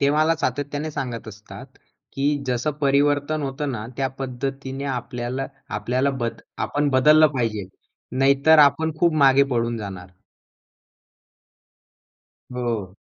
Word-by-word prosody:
ते 140 Hz, 0 st, +3 dB
मला 155 Hz, +2 st, +3 dB
सातत्याने 145 Hz, +2 st, -3 dB
सांगत 125 Hz, -6 st, -5 dB
असतात, 105 Hz, 0 st, -11 dB, 0.5 s
की 135 Hz, +1 st, -1 dB, 0.2 s
जसं 125 Hz, +4 st, 0 dB
परिवर्तन 145 Hz, +2 st, +2 dB
होतं 140 Hz, +1 st, -3 dB
ना 110 Hz, -3 st, -5 dB
त्या 135 Hz, -1 st, 0 dB
पद्धतीने 135 Hz, +1 st, -4 dB
आपल्याला 125 Hz, +1 st, -4 dB, 0.3 s
आपल्याला 125 Hz, +6 st, 0 dB
बद 115 Hz, -, -3 dB, 0.3 s
आपण 145 Hz, 0 st, 0 dB
बदललं 150 Hz, +4 st, +6 dB
पाहिजे. 110 Hz, -5 st, -1 dB, 0.5 s
नाहीतर 140 Hz, +4 st, +5 dB
आपण 150 Hz, +2 st, +4 dB
खूप 170 Hz, 0 st, +3 dB
मागे 135 Hz, +1 st, +6 dB
पडून 120 Hz, -1 st, 0 dB
जाणार. 95 Hz, -4 st, -7 dB, 2.4 s
हो. 115 Hz, -7 st, -3 dB
135 Hz, 115 wpm, -23 LUFS, 120-145 Hz, 2.4 s, बदललं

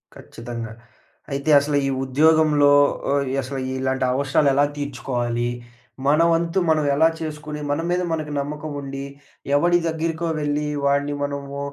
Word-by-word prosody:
ఖచ్చితంగా. 115 Hz, -1 st, -8 dB, 0.6 s
అయితే, 140 Hz, +3 st, -2 dB
అసలు 145 Hz, 0 st, 0 dB
ఈ -, -, 0 dB
ఉద్యోగంలో 150 Hz, +1 st, +4 dB, 0.4 s
ఓహ్, 140 Hz, 0 st, +1 dB
అసలు 135 Hz, +1 st, -3 dB, 0.2 s
ఇలాంటి 130 Hz, 0 st, 0 dB
అవసరాలు 140 Hz, +2 st, +2 dB
ఎలా 140 Hz, +2 st, +4 dB
తీర్చుకోవాలి? 120 Hz, -4 st, -2 dB, 0.6 s
మన 150 Hz, +3 st, +4 dB
వంతు 170 Hz, +3 st, +1 dB
మనం 155 Hz, -2 st, +2 dB
ఎలా 160 Hz, +2 st, +5 dB
చేసుకొని, 150 Hz, -1 st, -6 dB
మన 145 Hz, -, 0 dB
మీద 180 Hz, +1 st, +1 dB
మనకి 155 Hz, -2 st, -3 dB
నమ్మకం 150 Hz, +2 st, -5 dB
ఉండి, 135 Hz, 0 st, -6 dB, 0.5 s
ఎవడి 175 Hz, +4 st, +4 dB
దగ్గరికో 165 Hz, +1 st, -2 dB
వెళ్లి, 150 Hz, 0 st, -1 dB, 0.2 s
వాడిని 140 Hz, +1 st, +1 dB
మనము 140 Hz, 0 st, -4 dB
145 Hz, 135 wpm, -22 LUFS, 135-155 Hz, 0.6 s, ఎలా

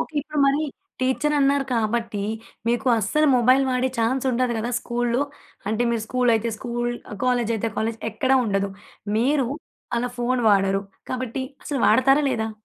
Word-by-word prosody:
Okay. 315 Hz, -, -5 dB
ఇప్పుడు 305 Hz, +1 st, -5 dB
మరి 280 Hz, +3 st, +2 dB, 0.4 s
teacher 260 Hz, +4 st, +1 dB
అన్నారు 275 Hz, 0 st, +3 dB
కాబట్టి, 225 Hz, -2 st, -1 dB, 0.5 s
మీకు 240 Hz, +2 st, 0 dB
అస్సలు 300 Hz, +9 st, +2 dB
మొబైల్ 255 Hz, +3 st, +4 dB
వాడే 255 Hz, 0 st, +1 dB
చాన్స్ 245 Hz, +4 st, +1 dB
ఉండదు 250 Hz, 0 st, +1 dB
కదా! 235 Hz, +2 st, -2 dB
స్కూల్లో. 240 Hz, +1 st, 0 dB, 0.5 s
అంటే 220 Hz, +2 st, 0 dB
మీరు 230 Hz, -2 st, -1 dB
స్కూల్ 250 Hz, -1 st, +2 dB
అయితే 225 Hz, +1 st, 0 dB
స్కూల్. 240 Hz, -1 st, -2 dB, 0.3 s
కాలేజ్ 245 Hz, -2 st, +1 dB
అయితే 225 Hz, +1 st, -2 dB
కాలేజ్. 225 Hz, +1 st, -1 dB
ఎక్కడ 260 Hz, +5 st, 0 dB
ఉండదు 200 Hz, -2 st, 0 dB, 0.5 s
మీరు 265 Hz, +3 st, +2 dB, 0.5 s
అలా 245 Hz, +1 st, 0 dB
ఫోన్ 245 Hz, +1 st, +1 dB
వాడరు. 195 Hz, -1 st, +3 dB, 0.3 s
కాబట్టి 255 Hz, 0 st, -3 dB, 0.2 s
అసలు 280 Hz, -3 st, -2 dB
వాడతారా? 270 Hz, +6 st, +4 dB
లేదా? 220 Hz, -3 st, -1 dB
245 Hz, 150 wpm, -23 LUFS, 225-260 Hz, 0.5 s, మొబైల్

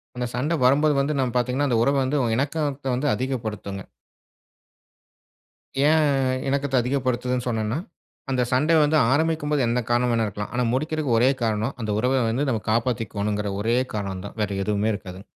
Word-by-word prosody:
அந்த 125 Hz, 0 st, -2 dB
சண்ட 145 Hz, +7 st, -1 dB
வரும்போது 145 Hz, +4 st, +4 dB
வந்து 140 Hz, +1 st, 0 dB
நம்ம 130 Hz, -3 st, 0 dB
பார்த்தீங்கன்னா, 130 Hz, +3 st, 0 dB
அந்த 120 Hz, -, +2 dB
உறவை 140 Hz, +3 st, +2 dB
வந்து 145 Hz, +3 st, 0 dB, 0.2 s
இணக்கத்தை 140 Hz, -1 st, -1 dB
வந்து 140 Hz, +4 st, -1 dB
அதிகப்படுத்துங்க. 110 Hz, -6 st, -4 dB, 2.1 s
ஏன் 155 Hz, 0 st, +4 dB, 0.5 s
இணக்கத்த 140 Hz, -1 st, 0 dB
அதிகப்படுத்துதுன்னு 125 Hz, -1 st, -1 dB
சொன்னன்னா, 110 Hz, +1 st, -1 dB, 0.5 s
அந்த 125 Hz, -, +1 dB
சண்ட 140 Hz, +6 st, +2 dB
வந்து 150 Hz, +1 st, +3 dB
ஆரம்பிக்கும் 155 Hz, 0 st, +1 dB
போது, 145 Hz, -, +2 dB
என்ன 120 Hz, +1 st, +1 dB
காரணம் 120 Hz, +1 st, +2 dB
வேண்டுமானாலும் 115 Hz, -2 st, +1 dB
இருக்கலாம். 105 Hz, +1 st, -6 dB
ஆனா 125 Hz, -, +1 dB
முடிக்கிறதுக்கு 150 Hz, -2 st, 0 dB
ஒரே 125 Hz, +3 st, +5 dB
காரணம், 110 Hz, +3 st, -1 dB
அந்த 110 Hz, -, -2 dB
உறவை 130 Hz, +3 st, +2 dB
வந்து 135 Hz, +6 st, 0 dB
நாம் 110 Hz, -4 st, -2 dB
காப்பாத்திகோனும்ன்கிற 105 Hz, -3 st, -1 dB
ஒரே 115 Hz, +3 st, +1 dB, 0.2 s
காரணம் 95 Hz, -2 st, -4 dB
தான். 100 Hz, -, -9 dB
வேறு 100 Hz, -1 st, -1 dB
எதுவுமே 105 Hz, +1 st, 0 dB
இருக்காதுங்க. 95 Hz, -1 st, -8 dB
125 Hz, 155 wpm, -24 LUFS, 110-140 Hz, 2.1 s, ஒரே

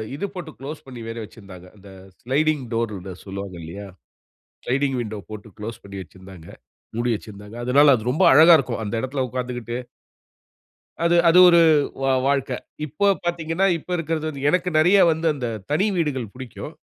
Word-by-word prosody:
இது 200 Hz, -, -3 dB
போட்டு 170 Hz, -3 st, -7 dB
குளோஸ் 145 Hz, +3 st, -8 dB
பண்ணி 125 Hz, -3 st, -10 dB
வேற 115 Hz, +1 st, -6 dB
வெச்சுதிருந்தாங்க. 95 Hz, -4 st, -13 dB
அந்த 100 Hz, 0 st, -15 dB, 0.3 s
ஸ்லைடிங் 145 Hz, +2 st, 0 dB
டோர்ன்னு 100 Hz, -5 st, -3 dB
சொல்லுவாங்க 100 Hz, -1 st, -7 dB
இல்லையா. 100 Hz, +5 st, -8 dB, 0.8 s
ஸ்லைடிங் 135 Hz, +1 st, 0 dB
விண்டோ 110 Hz, -2 st, -5 dB
போட்டு 110 Hz, +1 st, -9 dB
குளோஸ் 110 Hz, +2 st, -7 dB
பண்ணி 100 Hz, 0 st, -9 dB
வச்சிருந்தாங்க, 95 Hz, -2 st, -14 dB, 0.5 s
மூடி 120 Hz, +1 st, 0 dB
வச்சுருந்தாங்க. 105 Hz, +1 st, -10 dB
அதுனால 140 Hz, +3 st, +5 dB
அது 115 Hz, +2 st, -3 dB
ரொம்ப 140 Hz, -, +2 dB
அழகா 160 Hz, +4 st, +8 dB
இருக்கும். 125 Hz, -5 st, -3 dB
அந்த 105 Hz, -, -4 dB
இடத்துல 130 Hz, +1 st, -2 dB
உக்காந்துகிட்டு 125 Hz, -1 st, -4 dB, 1.3 s
அது 170 Hz, +1 st, +3 dB
அது 165 Hz, +2 st, +6 dB
ஒரு 170 Hz, -, +6 dB, 0.4 s
வா 135 Hz, -, +2 dB, 0.2 s
வாழ்க்கை. 135 Hz, -2 st, 0 dB, 0.3 s
இப்போ 155 Hz, +8 st, -1 dB, 0.2 s
பாத்தீங்கன்னா, 175 Hz, +2 st, 0 dB
இப்ப 165 Hz, -, -14 dB
இருக்கிறது 160 Hz, -1 st, -2 dB
வந்து 140 Hz, -2 st, -4 dB
எனக்கு 180 Hz, 0 st, +1 dB
நெறைய 180 Hz, +6 st, +5 dB
வந்து 160 Hz, +1 st, -3 dB
அந்த 125 Hz, -4 st, -4 dB, 0.2 s
தனி 165 Hz, +8 st, +2 dB
வீடுகள் 135 Hz, -, -2 dB
புடிக்கும். 130 Hz, -2 st, -8 dB
130 Hz, 155 wpm, -22 LUFS, 105-155 Hz, 1.3 s, அழகா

